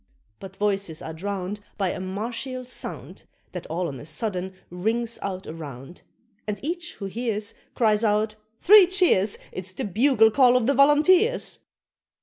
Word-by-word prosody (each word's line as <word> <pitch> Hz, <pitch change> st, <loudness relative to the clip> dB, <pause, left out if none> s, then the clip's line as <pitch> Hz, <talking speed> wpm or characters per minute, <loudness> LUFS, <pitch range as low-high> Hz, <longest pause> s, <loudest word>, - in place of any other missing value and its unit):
But 195 Hz, -1 st, -10 dB
voices 195 Hz, -6 st, -1 dB
are 160 Hz, -, -6 dB
drowned 195 Hz, +3 st, -4 dB, 0.2 s
By 195 Hz, -2 st, 0 dB
a -, -, -5 dB
martial 235 Hz, +7 st, -4 dB
sound 255 Hz, -, -7 dB, 0.3 s
That 180 Hz, -, -7 dB
all 170 Hz, +2 st, -2 dB
on 135 Hz, -4 st, -7 dB
a -, -, -10 dB
sudden 185 Hz, +2 st, -3 dB, 0.2 s
rings 225 Hz, +6 st, -2 dB
out 190 Hz, -1 st, -4 dB
around; 150 Hz, -1 st, -9 dB, 0.5 s
And 205 Hz, -1 st, -3 dB
each 345 Hz, +4 st, -4 dB
who 200 Hz, -, -7 dB
hears 215 Hz, 0 st, -3 dB, 0.2 s
Cries 215 Hz, -2 st, +2 dB
out, 215 Hz, 0 st, +1 dB, 0.3 s
"Three 405 Hz, -1 st, +8 dB
cheers! 350 Hz, -, +2 dB
It's 185 Hz, 0 st, -5 dB
the -, -, -5 dB
bugle 225 Hz, +2 st, +4 dB
call 250 Hz, +1 st, +5 dB
of 245 Hz, -, 0 dB
the 280 Hz, -, +3 dB
Volunteers!" 310 Hz, -, +3 dB
210 Hz, 150 wpm, -24 LUFS, 185-250 Hz, 0.5 s, Three